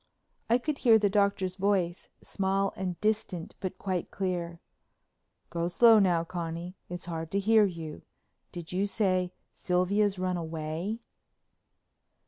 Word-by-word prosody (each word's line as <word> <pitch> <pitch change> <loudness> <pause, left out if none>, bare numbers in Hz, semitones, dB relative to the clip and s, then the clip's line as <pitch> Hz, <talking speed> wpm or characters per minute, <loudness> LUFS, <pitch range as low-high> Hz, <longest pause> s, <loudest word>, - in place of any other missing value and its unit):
I 235 - +5
could 280 +3 -3
hear 230 -4 +6
the 205 -2 +1
Doctor's 200 -2 +1
voice, 190 -3 0
small 195 0 0
and 180 -3 -4
distant 210 -5 -1
but 185 - -4
quite 185 -3 -2
clear: 175 -3 -3 0.9
"Go 170 0 -1
slow 225 +5 +6
now, 175 -4 +3
Connie, 170 0 -5 0.2
it's 175 0 -6
hard 165 -2 -4
to 195 - -1
hear 215 +2 +5
you. 165 -5 -5 0.5
Did 170 -2 -8
you 190 +3 0
say 185 -4 +1 0.2
Sylvia'd 195 +3 +1
run 185 -1 -1
away?" 165 +6 -4
185 Hz, 130 wpm, -29 LUFS, 170-200 Hz, 0.9 s, hear